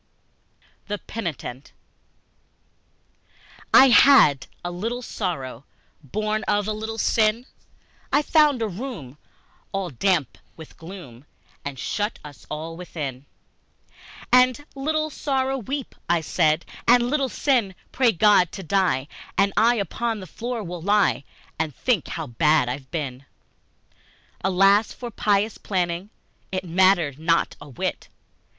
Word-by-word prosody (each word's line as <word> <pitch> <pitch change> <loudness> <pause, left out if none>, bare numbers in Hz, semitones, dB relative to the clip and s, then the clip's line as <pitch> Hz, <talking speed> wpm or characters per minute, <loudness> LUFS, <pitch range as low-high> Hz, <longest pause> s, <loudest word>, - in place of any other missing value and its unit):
The 205 -1 -2
Penitent 155 - -6 2.0
I 270 - +8
HAD 240 - +6 0.2
a 175 - -2
little 230 +8 -4
Sorrow, 135 - -4 0.4
Born 215 +9 -2
of 205 0 +1
a 215 - 0
little 220 +1 -5
Sin, 225 +2 +2 0.7
I 290 - +3
found 295 -5 +3
a - - 0
room 180 - -7 0.5
all 195 -3 -3
damp 150 - 0 0.2
with 160 -2 -12
gloom 160 -8 -11 0.4
And 140 -1 -6
shut 205 - -2
us 145 -2 -13
all 160 +2 -5
within; 145 -6 -6 1.1
And, 255 +3 +4
"Little 310 +3 -1
Sorrow, 270 -2 -1
weep," 270 +4 -5 0.3
said 155 +2 +1 0.2
I, 235 - +8
"And, 240 -1 +1
Little 275 0 0
Sin, 240 -11 +1 0.2
pray 255 -3 +3
God 195 -2 +4
to 195 - -6
Die, 165 -7 +1 0.3
And 195 0 +3
I 235 +3 +4
upon 225 +2 -2
the 190 - -8
floor 235 +6 -5
will 175 -1 -6
lie 200 -5 +2 0.4
And 155 -4 -2
think 235 - 0
how 160 - -4
bad 150 +2 +2
I've 130 +1 -6
been!" 140 -5 -5 1.2
Alas 195 +3 +4
for 240 -2 -7
pious 210 +1 0
planning 180 0 -2 0.4
It 185 0 -2
mattered 175 -5 +3
not 165 +1 +1
a - - -11
whit! 125 - -4
195 Hz, 125 wpm, -23 LUFS, 155-230 Hz, 2.0 s, I